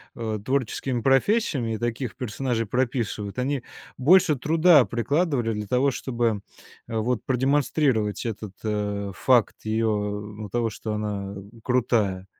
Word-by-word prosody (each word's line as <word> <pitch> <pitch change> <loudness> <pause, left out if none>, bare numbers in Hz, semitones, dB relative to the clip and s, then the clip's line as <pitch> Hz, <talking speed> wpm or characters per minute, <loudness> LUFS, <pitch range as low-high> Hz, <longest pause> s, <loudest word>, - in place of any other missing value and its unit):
э, 110 -3 -3
творческими 130 -1 -1
профессиями 135 - +2
и - - -3
таких 120 +1 -3
персонажей 120 -1 -2
прописывают, 115 -3 -2
они 135 +1 -1 0.4
больше 155 +2 +5
труда 155 +2 +5
прикладывали 120 - 0
для 105 -1 -4
того, 130 +5 +2
чтобы, 120 -5 -1 0.5
э, 115 - -5
вот 115 +2 0
продемонстрировать 130 -4 +1
этот, 105 -3 -5
э, 105 -2 -2
факт 125 -4 +3
ее 110 +1 0
ну 105 0 -3
того, 115 +1 0
что 110 +1 -5
она, 100 -2 -3
э, - - -7 0.2
крутая. 110 -7 +1
115 Hz, 130 wpm, -25 LUFS, 105-130 Hz, 0.5 s, больше